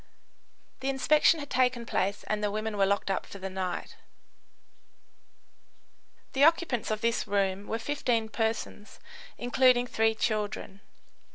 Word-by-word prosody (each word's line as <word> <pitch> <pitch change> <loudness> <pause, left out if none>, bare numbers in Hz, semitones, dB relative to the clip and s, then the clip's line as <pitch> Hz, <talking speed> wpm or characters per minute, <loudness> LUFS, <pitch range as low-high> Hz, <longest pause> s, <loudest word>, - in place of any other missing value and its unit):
The 265 - -2
inspection 300 +4 +4
had 285 -1 -8
taken 250 -2 +1
place 200 -2 -1
and 210 0 -2
the 210 - +1
women 215 +1 -3
were 195 -1 +3
locked 200 0 0
up - - -2
for - - -10
the 190 0 -6
night. 185 -2 -4 2.4
The 270 - +2
occupants 320 -7 +3
of 215 -1 -2
this 230 0 0
room 195 0 0
were 225 - -2
15 230 -3 -1
persons, 220 -2 -3 0.4
including 245 0 +3
three 225 -2 +1
children. 210 -3 -2
220 Hz, 130 wpm, -28 LUFS, 205-250 Hz, 2.4 s, inspection